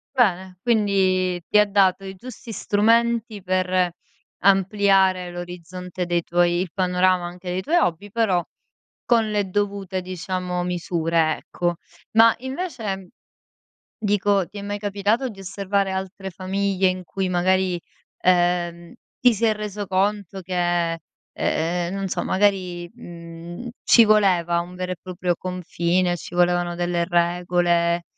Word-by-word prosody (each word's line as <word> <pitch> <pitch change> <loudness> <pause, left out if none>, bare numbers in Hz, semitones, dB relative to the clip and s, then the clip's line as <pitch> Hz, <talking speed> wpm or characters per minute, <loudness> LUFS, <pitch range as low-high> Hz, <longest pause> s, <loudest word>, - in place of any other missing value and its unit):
Bene, 190 -6 +1
quindi 190 -5 +2
ti - - +3
ha 210 - +6
dato 195 -1 +2
i 190 0 -7
giusti 240 +3 -10
strumenti 225 0 +1
per 185 -1 +1 0.5
ampliare 195 -2 +3
l'orizzonte 180 +1 -6
dei 175 0 0
tuoi 175 +1 +1
il 185 0 -2
panorama 185 -1 +2
anche 180 +1 -8
dei 185 +1 -1
tuoi 330 - +1
hobby, 200 - 0
però 195 -7 +1 0.6
con 230 -3 +3
le 205 -2 0
dovute 200 -1 -2
diciamo 180 0 -3
misure, 165 -2 0
ecco. 175 0 -2 0.4
Ma, 230 0 +7
invece 250 - -4 0.9
dico, 205 -3 +1
ti 205 - -11
è 200 - -5
mai 205 0 -3
capitato 205 +5 0
di 200 - -12
osservare 195 +1 -1
altre 190 +1 -5
famiglie 190 +1 0
in 185 -1 -4
cui 190 +2 -2
magari, 185 0 +1 0.4
ehm, 175 -1 +1 0.3
ti 245 -1 +6
sei 220 +1 +2
reso 210 -1 -5
conto 195 0 -1
che, 175 -2 0 0.3
ehm, 175 +3 -1
non 195 -1 -3
so - - -1
magari, 185 -3 0
mhmm, 170 0 -9 0.2
ci 235 - +7
voleva 185 -6 +3
un 175 +1 -6
vero 185 0 -4
e 180 - -4
proprio 180 -1 -2
confine, 180 0 -1
ci 175 - -9
volevano 175 0 +2
delle 175 0 0
regole, 175 0 +1
185 Hz, 130 wpm, -23 LUFS, 175-200 Hz, 0.9 s, Ma